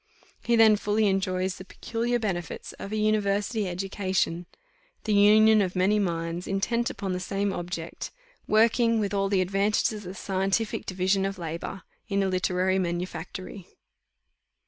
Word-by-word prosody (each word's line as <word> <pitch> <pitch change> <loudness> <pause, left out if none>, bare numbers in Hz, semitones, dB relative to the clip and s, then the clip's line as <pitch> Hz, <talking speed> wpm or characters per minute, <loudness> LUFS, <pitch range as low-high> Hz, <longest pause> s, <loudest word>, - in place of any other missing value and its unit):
He 235 - +2
then 220 -2 +6
fully 210 +1 +1
enjoys 190 -1 0
the - - -8
peculiar 235 +5 -2
benefits 190 -7 -4
of 200 - -7
a - - -2
university 210 0 +1
education, 185 -2 -2 0.6
the 215 - 0
union 215 +1 +6
of 185 -2 -1
many 195 +3 +3
minds 170 -2 -2
intent 235 +5 0
upon 195 -2 -4
the 180 - -2
same 195 +2 -1
object, 175 -2 -5 0.4
working, 230 +1 +3
with 205 -1 -1
all 195 0 +1
the 195 -2 +2
advantages 200 +4 +1
of 210 -1 -7
the 185 +2 -7
scientific 195 +3 -1
division 190 +1 +1
of 195 0 -2
labour, 170 +3 -5 0.3
in 200 -1 +1
a - - +1
literary 185 0 +1
manufactory. 180 +1 -5
195 Hz, 145 wpm, -27 LUFS, 185-210 Hz, 0.6 s, then